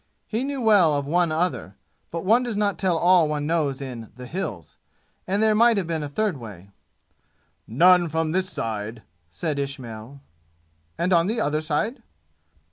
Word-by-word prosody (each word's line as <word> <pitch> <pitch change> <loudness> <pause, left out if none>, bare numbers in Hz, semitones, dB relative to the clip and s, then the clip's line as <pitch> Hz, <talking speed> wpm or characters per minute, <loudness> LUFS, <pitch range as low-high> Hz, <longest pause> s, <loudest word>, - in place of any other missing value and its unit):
He 225 +3 -2
knew 275 -1 -3
well 200 -9 +5
of 140 -1 -2
one 170 +2 +1
other, 150 - -2 0.3
but 170 +2 -5
one 225 +5 +4
does 240 -4 -3
not 205 -1 0
tell 185 -3 +1
all 175 -1 +4
one 150 -1 -2
knows 150 -4 0
in 120 -5 -7
the 125 +1 -9
"Hills," 125 - -6 0.5
and 200 +3 +1
there 220 -1 +4
might 230 +1 +4
have 195 - 0
been 160 -1 -2
a 145 - -4
third 205 +1 -1
way. 100 -5 -11 1.0
"None 175 +7 +5
from 160 0 -1
this 185 +2 0
side," 110 - -5 0.3
said 140 - -3
Ismail. 135 -2 -6 0.8
"And 180 +2 +1
on 170 0 +4
the 225 +3 -1
other 150 +1 0
side?" 160 - -2
160 Hz, 170 wpm, -24 LUFS, 135-190 Hz, 1.0 s, well